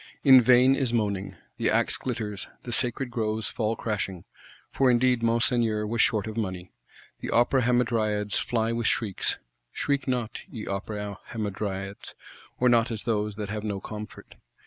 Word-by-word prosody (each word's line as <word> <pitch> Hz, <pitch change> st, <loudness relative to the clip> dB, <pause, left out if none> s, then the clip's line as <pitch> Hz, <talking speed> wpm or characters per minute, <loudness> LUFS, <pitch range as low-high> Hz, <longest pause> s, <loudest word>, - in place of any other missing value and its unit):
In 130 Hz, -3 st, +9 dB
vain 125 Hz, +2 st, +6 dB
is 135 Hz, -3 st, 0 dB
moaning. 100 Hz, -4 st, -1 dB, 0.2 s
The -, -, +1 dB
axe -, -, +2 dB
glitters; 110 Hz, -5 st, -4 dB, 0.2 s
the 120 Hz, -, -6 dB
sacred 125 Hz, +2 st, -1 dB
groves 110 Hz, -2 st, -1 dB
fall 110 Hz, -1 st, -1 dB
crashing,—for 105 Hz, +5 st, -3 dB
indeed 125 Hz, 0 st, +3 dB
Monseigneur 115 Hz, -2 st, +2 dB
was 115 Hz, +1 st, +1 dB
short 105 Hz, -3 st, +2 dB
of 110 Hz, -1 st, -6 dB
money: 95 Hz, -5 st, -4 dB, 0.5 s
the -, -, -5 dB
Opera 120 Hz, +3 st, +3 dB
Hamadryads 110 Hz, -4 st, +1 dB
fly 115 Hz, -1 st, 0 dB
with 115 Hz, -1 st, 0 dB
shrieks. 105 Hz, -5 st, 0 dB, 0.3 s
Shriek 140 Hz, -1 st, -1 dB
not, 125 Hz, -4 st, -2 dB
ye 110 Hz, -4 st, -7 dB
Opera 100 Hz, 0 st, -4 dB
Hamadryads; 100 Hz, -2 st, -4 dB, 0.4 s
or 125 Hz, -, +3 dB
not 120 Hz, -1 st, +4 dB
as 110 Hz, -3 st, -4 dB
those 105 Hz, -2 st, -1 dB
that 105 Hz, -1 st, -5 dB
have 105 Hz, 0 st, -4 dB
no 100 Hz, -2 st, -2 dB
comfort. 105 Hz, +1 st, -9 dB
110 Hz, 150 wpm, -27 LUFS, 105-120 Hz, 0.5 s, In